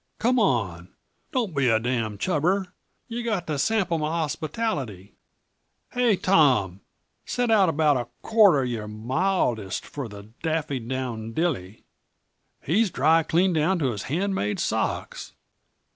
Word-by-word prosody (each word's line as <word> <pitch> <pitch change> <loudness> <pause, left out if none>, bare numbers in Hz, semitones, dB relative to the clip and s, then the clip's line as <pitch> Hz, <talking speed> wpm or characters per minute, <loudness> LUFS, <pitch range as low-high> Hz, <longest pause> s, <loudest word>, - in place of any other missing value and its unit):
Come 250 +2 +2
on 95 - 0 0.4
don't 225 - -1
be 140 -2 +2
a 110 -2 +4
damn' 115 -3 -2
chubber! 180 - 0 0.3
Yuh 240 0 -4
got 215 -7 -1
to 150 -3 -2
sample 190 0 +1
m' - - -4
hospitality. 155 - -3 0.8
Hey, 245 -4 +3
Tom! 130 - +3 0.4
set 245 -2 -1
out 200 -5 +5
about 150 -3 +3
a 120 -1 -3 0.2
quart 215 -7 +5
uh - - +2
your 115 -4 -3
mildest 115 - -1
for 140 -4 -6 0.3
Daffy 155 -4 -1
down 115 -2 -4
Dilly. 115 - -2 0.8
He's 200 +8 +2
dry, 160 +2 +3
clean 175 +3 +2
down 165 +4 +2
to 140 -6 0
his 105 -4 -5
hand 190 +7 0
made 105 - -1
socks." - - -2
155 Hz, 135 wpm, -25 LUFS, 120-190 Hz, 0.8 s, out